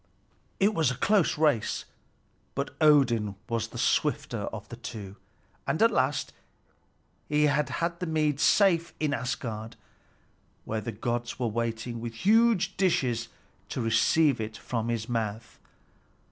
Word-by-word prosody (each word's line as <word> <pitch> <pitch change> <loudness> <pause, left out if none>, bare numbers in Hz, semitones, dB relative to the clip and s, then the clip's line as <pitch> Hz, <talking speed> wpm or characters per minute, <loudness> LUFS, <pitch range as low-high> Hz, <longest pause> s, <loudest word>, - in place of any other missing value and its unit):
It 205 +2 +3
was 160 -7 +2
a 125 - -2
close 205 -2 +2
race; 145 -8 +1 0.7
but - - -3
Odin 120 -9 +4
was 115 -2 -1
the - - -10
swifter - - 0
of - - -8
the - - -7
two, 100 -3 -8 0.5
and - - 0
at 230 +1 +5
last 135 -5 0 1.0
he 150 0 +3
had 150 0 +2 0.3
the 180 - -3
mead 155 -3 +1
safe 170 -2 +3
in 150 -2 0
Asgard, 115 -3 -4 0.9
where 110 0 -2
the 115 - -4
gods 120 +1 -3
were 125 - -1
waiting 115 +1 -3
with 115 -1 -6
huge 220 - +3
dishes 125 -11 +1 0.4
to - - -4
receive 120 +4 +3
it 110 0 -5
from 115 -1 -3
his 115 -1 -2
mouth. 115 -1 -3
125 Hz, 135 wpm, -28 LUFS, 115-155 Hz, 1.0 s, at